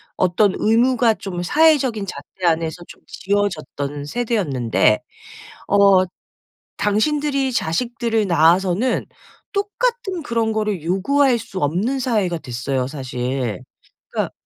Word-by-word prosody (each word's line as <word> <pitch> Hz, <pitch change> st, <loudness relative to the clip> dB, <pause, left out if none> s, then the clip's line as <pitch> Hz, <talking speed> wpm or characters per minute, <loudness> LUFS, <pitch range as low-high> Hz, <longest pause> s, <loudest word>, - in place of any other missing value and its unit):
어떤 185 Hz, +2 st, +2 dB
의무가 235 Hz, +1 st, +3 dB
좀 190 Hz, -4 st, -6 dB
사회적인 270 Hz, -, +3 dB
잣대 185 Hz, -1 st, -7 dB
안에서 165 Hz, +1 st, 0 dB
좀 -, -, -14 dB
지어졌던 155 Hz, -8 st, -2 dB
세대였는데 145 Hz, -, +1 dB, 0.7 s
어 200 Hz, -2 st, +5 dB, 0.7 s
당신들이 275 Hz, +5 st, +1 dB
자식들을 230 Hz, +3 st, -1 dB
낳아서는 180 Hz, +8 st, +2 dB, 0.5 s
똑같은 410 Hz, -2 st, -2 dB
그런 230 Hz, -4 st, 0 dB
거를 210 Hz, -6 st, -1 dB
요구할 240 Hz, -, +2 dB
수 220 Hz, -4 st, -7 dB
없는 190 Hz, -, 0 dB
사회가 205 Hz, -9 st, 0 dB
됐어요 130 Hz, -1 st, -3 dB
사실. 125 Hz, -5 st, -3 dB, 0.5 s
그러니까 -, -, -2 dB
200 Hz, 260 characters per minute, -20 LUFS, 160-245 Hz, 0.7 s, 어